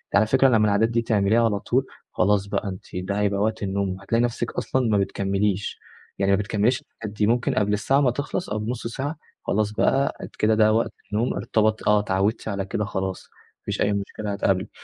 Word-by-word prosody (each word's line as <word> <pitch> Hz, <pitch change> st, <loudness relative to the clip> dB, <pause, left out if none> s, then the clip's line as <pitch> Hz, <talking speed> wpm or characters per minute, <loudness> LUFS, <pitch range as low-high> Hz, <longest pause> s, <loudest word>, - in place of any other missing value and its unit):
على 105 Hz, +2 st, +5 dB
فكرة 130 Hz, +3 st, +4 dB
لمَّا 110 Hz, -3 st, +4 dB
العادات 105 Hz, +2 st, +3 dB
دي 115 Hz, 0 st, +1 dB
تعمليها 110 Hz, +1 st, +2 dB
على 105 Hz, -3 st, +1 dB
طول، -, -, 0 dB, 0.3 s
خلاص 100 Hz, +1 st, +2 dB
بقى 100 Hz, -, -2 dB
أنتِ 95 Hz, -, -8 dB
ده 95 Hz, +3 st, -2 dB
هيبقى 100 Hz, -1 st, +1 dB
وقت 110 Hz, 0 st, -1 dB
النوم، 95 Hz, -1 st, -2 dB
هتلاقي 115 Hz, +4 st, +1 dB
نفسك 120 Hz, 0 st, -1 dB
أصلًا 130 Hz, -2 st, -1 dB
ما 105 Hz, -, +3 dB
بتكمّليش، 100 Hz, 0 st, -1 dB, 0.4 s
يعني 100 Hz, 0 st, +2 dB
ما 100 Hz, -, +4 dB
بتكمّليش 105 Hz, +4 st, +1 dB
الحاجات 105 Hz, -2 st, -7 dB
دي، 105 Hz, -, +2 dB
ممكن 120 Hz, +1 st, +1 dB
قبل 105 Hz, 0 st, +1 dB
الساعة 135 Hz, +7 st, +2 dB
ما 125 Hz, -4 st, +3 dB
تخلص 145 Hz, +7 st, -3 dB
أو 105 Hz, 0 st, -2 dB
ب0،5 115 Hz, +2 st, -3 dB
ساعة، 140 Hz, +6 st, -4 dB, 0.3 s
خلاص 105 Hz, 0 st, 0 dB
بقى 135 Hz, +5 st, +1 dB, 0.2 s
كده 110 Hz, +1 st, +3 dB
ده 110 Hz, 0 st, +4 dB
وقت 115 Hz, -, +1 dB, 0.2 s
النوم، 115 Hz, +4 st, +1 dB
ارتبط 110 Hz, 0 st, 0 dB
آه، 105 Hz, 0 st, +5 dB
اتعودتِ 100 Hz, +2 st, 0 dB
على 100 Hz, -2 st, -2 dB
كده 105 Hz, +2 st, -2 dB
خلاص، 95 Hz, -1 st, -3 dB
ما -, -, -29 dB
فيش -, -, -3 dB
أي 105 Hz, -, +2 dB
مشكلة 100 Hz, +1 st, -4 dB
هتقابلِك. 95 Hz, -1 st, 0 dB
105 Hz, 200 wpm, -24 LUFS, 100-115 Hz, 0.4 s, على